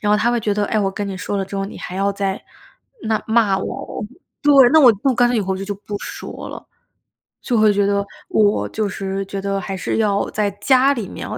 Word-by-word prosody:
然 210 - 0
后 - - +5
他 220 +3 +2
会 240 - +1
觉 210 -1 0
得： 205 0 0
“诶， 215 - 0
我 195 -2 +1
跟 205 +1 -4
你 195 -1 -5
说 190 +2 -3
了 195 - -1
之 195 - -10
后， 195 - -1
你 195 - -8
还 180 - -7
要 200 +1 +1
在 195 -1 -2 0.6
那 220 -1 0
骂 220 -4 +3
我 - - -4
哦”， - - -6 0.4
对， 290 - +5 0.2
“那 315 - +7
我 255 -4 +8
以 - - 0
后 270 -2 +3
干 240 +1 +4
脆 245 - +1
以 - - +2
后 190 -1 -2
就 195 - -5
就 205 0 -4
不 205 +1 -7
说 - - -8
了。” - - -9 0.8
就 245 - 0
会 215 -1 +5
觉 200 0 +2
得 200 0 +1 0.2
我 210 -1 +2
就 215 -1 -2
是 195 0 -4
觉 195 0 -5
得 195 0 -1
还 195 -1 -5
是 180 - -2
要 205 -2 +1
在 210 -1 0
家 260 +5 +4
里 230 -8 -5
面 - - -7
哦， - - -5
205 Hz, 280 characters per minute, -20 LUFS, 195-220 Hz, 0.8 s, 我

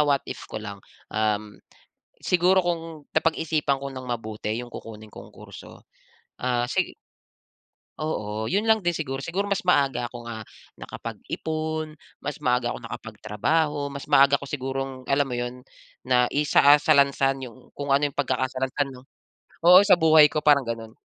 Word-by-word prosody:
what 145 -2 +2
if - - -8
ko - - -7
lang, 105 -2 -7 0.3
um, 105 -1 -1 0.6
siguro 180 +1 +3
kung 165 -3 -4
napag-isipan 155 -3 0
ko 140 - -5
nang 130 -1 -8
mabuti 110 -3 -5
yung 120 0 -6
kukunin 110 -1 -10
kong - - -11
kurso, - - -13 0.6
ah, 120 -1 0
si 125 - -2 1.0
oo, 110 -8 -3
yun 200 +3 +1
lang 220 -1 +4
din 175 -3 -1
siguro, 135 -3 -4
siguro 185 +7 -2
mas 200 -1 -1
maaga 135 -7 +2
akong, 120 -1 -10
ah, 115 -1 -6 0.4
nakapag-ipon, 155 -1 -5 0.2
mas 145 - -4
maaga 125 -3 +1
akong - - -8
nakapagtrabaho, 115 +9 -1 0.2
mas 140 0 -8
maaga 140 +1 +5
ako 140 - -8
sigurong 135 -1 -4
alam 140 +1 +1
mo 125 - -3
'yon? 120 +1 -4 0.5
Naisaa 145 +3 +4
salansan 140 -3 +3
yung 125 +1 -13
kung 140 -1 -2
ano 145 +1 +3
'yong - - -17
pagkakasalansan 130 +1 -1
'no 130 -1 -12 0.6
oo, 180 +2 +9
sa 185 - +7
buhay 160 -2 +6
ko 155 +1 -3
parang 140 -4 +4
ganun. 115 -1 -5
135 Hz, 150 wpm, -25 LUFS, 120-155 Hz, 1.0 s, oo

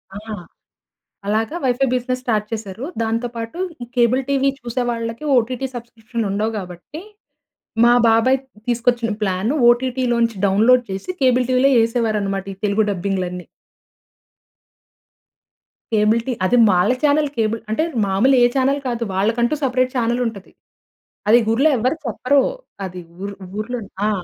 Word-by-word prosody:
ఆ! - - -5 1.1
అలాగా 220 +9 0
wifi 260 +1 +2
business 255 0 -1
start 215 -4 0
చేశారు. 220 0 -5 0.2
దాంతో 230 +2 -1
పాటు 230 +8 -6 0.2
ఈ - - -6
కేబుల్ 245 +2 +3
టీవీ 275 0 +2
చూసే 245 0 -3
వాళ్ళకి 230 +2 -4
ఓటీటీ 250 +3 -1
సబ్స్క్రిప్షన్‌లు 230 -1 -5
ఉండవు 210 +3 -1
గాబట్టి 180 - -8 0.8
మా 240 - +6
బాబాయ్ 230 +4 +4 0.3
తీసుకొచ్చిన 240 -1 +1
ప్లాన్ 190 +3 0 0.2
ఓటీటీలోంచి 240 -2 +1
డౌన్లోడ్ 225 +6 +4
చేసి 190 - -4
కేబుల్ 250 -1 +3
టీవీలో 255 +2 +4
వేసేవారన్నమాట, 215 -4 0
ఈ - - -14
తెలుగు 205 +1 +2
డబ్బింగ్‌లన్నీ. 180 -2 -3 2.5
Cable 215 +1 +3
TV. 250 -3 -2
అది 245 +6 +3
వాళ్ళ 180 +5 +3
చానెల్ 295 0 +3
కేబుల్ 225 0 0
అంటే 265 +9 +1 0.2
మామూలుగా 225 +8 +3
ఏ - - +6
చానెల్ 270 +1 +2
కాదు. 235 -1 -2
వాళ్ళకంటూ 235 +7 +1
సెపరేట్ 255 -1 +1
చానెల్ 240 0 0
ఉంటది. 200 -4 -8 0.8
అది 235 +3 +7
ఊర్లో 270 +7 +3
ఎవరు 255 +6 0
చెప్పరూ. 255 +5 +2 0.4
అది 185 -1 -7 0.2
ఊ - - -2 0.3
ఊర్లోని. 225 -1 -5 0.2
ఆ! - - +2
230 Hz, 130 wpm, -20 LUFS, 215-255 Hz, 2.5 s, అది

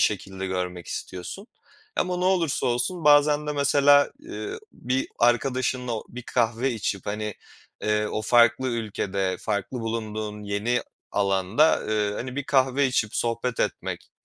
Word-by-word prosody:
şekilde 95 -2 0
görmek 90 -2 -3
istiyorsun 95 - -6 0.5
ama 180 0 0
ne 180 - -1
olursa 180 -6 +2
olsun 125 +8 -1
bazen 150 0 +5
de 150 - -1
mesela, 145 0 +5
eee, 350 +7 -6
bir 130 +2 -2
arkadaşınla 125 +1 +1
o 110 - -3
bir 125 +1 -8
kahve 120 +2 0
içip, 100 -3 -3
hani, 105 0 -3 0.5
eee, 105 0 +1
o 110 - -3
farklı 120 +3 +4
ülkede, 100 -5 -2
farklı 105 +5 -2
bulunduğun 110 -2 -4
yeni 105 +4 0 0.3
alanda, 100 +9 +2
eee, 105 -1 +1
hani, 125 +4 -5
bir 145 - -2
kahve 135 0 +3
içip 115 -4 0
sohbet 115 +1 -1
etmek - - -3
120 Hz, 140 wpm, -25 LUFS, 105-135 Hz, 0.5 s, bazen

